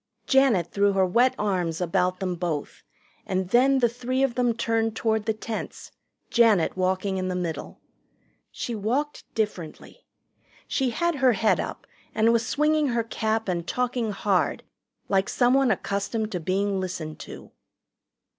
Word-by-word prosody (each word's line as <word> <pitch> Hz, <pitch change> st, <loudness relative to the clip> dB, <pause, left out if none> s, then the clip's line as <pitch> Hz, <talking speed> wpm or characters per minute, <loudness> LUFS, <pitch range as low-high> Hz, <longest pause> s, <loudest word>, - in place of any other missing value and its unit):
Janet 245 Hz, -, +3 dB
threw 200 Hz, 0 st, +2 dB
her 190 Hz, -1 st, +3 dB
wet 240 Hz, +8 st, +3 dB
arms 180 Hz, -6 st, -1 dB
about 180 Hz, +1 st, 0 dB
them 185 Hz, -1 st, -1 dB
both, 165 Hz, -4 st, -4 dB, 0.4 s
and 185 Hz, -1 st, -2 dB
then 265 Hz, +5 st, +4 dB
the 245 Hz, -2 st, +4 dB
three 250 Hz, +3 st, -2 dB
of 270 Hz, -3 st, +1 dB
them 245 Hz, -1 st, +2 dB
turned 225 Hz, -1 st, 0 dB
toward 220 Hz, -2 st, 0 dB
the -, -, +3 dB
tents, 220 Hz, 0 st, -6 dB, 0.4 s
Janet 220 Hz, -7 st, +4 dB
walking 185 Hz, +1 st, 0 dB
in 185 Hz, 0 st, -2 dB
the 185 Hz, -, -2 dB
middle. 175 Hz, -3 st, -5 dB, 0.7 s
She 240 Hz, -, -5 dB
walked 250 Hz, +8 st, -2 dB
differently. 210 Hz, -, -4 dB, 0.6 s
She 265 Hz, -2 st, 0 dB
had 340 Hz, +6 st, 0 dB
her 260 Hz, -3 st, +4 dB
head 220 Hz, +1 st, +2 dB
up -, -, -5 dB, 0.3 s
and 225 Hz, +1 st, +4 dB
was 235 Hz, +1 st, +1 dB
swinging 305 Hz, 0 st, +2 dB
her 235 Hz, -2 st, 0 dB
cap 220 Hz, -1 st, -2 dB
and 175 Hz, -2 st, -2 dB
talking 250 Hz, -2 st, -1 dB
hard, 195 Hz, -2 st, 0 dB, 0.4 s
like 195 Hz, 0 st, +1 dB
someone 255 Hz, +1 st, +3 dB
accustomed 210 Hz, +2 st, -1 dB
to 180 Hz, -, -2 dB
being 195 Hz, +3 st, 0 dB
listened 170 Hz, -4 st, -5 dB
to. -, -, -10 dB
220 Hz, 150 wpm, -25 LUFS, 185-245 Hz, 0.7 s, then